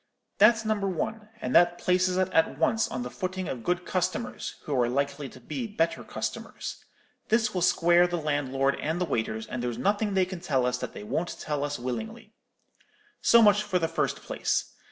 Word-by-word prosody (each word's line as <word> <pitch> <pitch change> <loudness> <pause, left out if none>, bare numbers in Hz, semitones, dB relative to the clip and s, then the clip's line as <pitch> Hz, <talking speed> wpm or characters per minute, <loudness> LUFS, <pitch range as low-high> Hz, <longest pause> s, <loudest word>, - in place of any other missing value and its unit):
That's 225 +2 +6
number 210 -2 0
one; 210 +4 -3
and 125 - -2
that 175 0 +5
places 180 0 +2
us 185 0 +2
at 160 -5 +3
once 220 +8 +2
on 125 - -4
the 125 - -6
footing 185 -1 -4
of 120 -3 -5
good 180 +4 -1
customers, 185 +7 -2
who 150 - -4
are 120 - +2
likely 140 +2 -1
to 130 - -14
be 235 - -4
better 170 -6 -1
customers. - - -5 0.5
This 225 0 +2
will 180 - -1
square 175 0 +4
the 175 0 -2
landlord 140 -3 0
and 160 +3 -1
the 180 - +1
waiters, 110 -6 -2
and 125 +2 -5
there's 120 -1 -2
nothing 205 0 0
they 190 -1 +4
can 185 -1 -7
tell 135 -7 0
us 125 0 0
that - - -5
they - - -8
won't 165 +11 -3
tell 150 -2 -2
us 145 0 -2
willingly. 220 - -5 0.9
So 235 -1 +6
much 205 -1 +6
for 205 -3 0
the 165 -2 +1
first 165 - -2
place. - - -1
175 Hz, 195 wpm, -27 LUFS, 140-200 Hz, 0.9 s, That's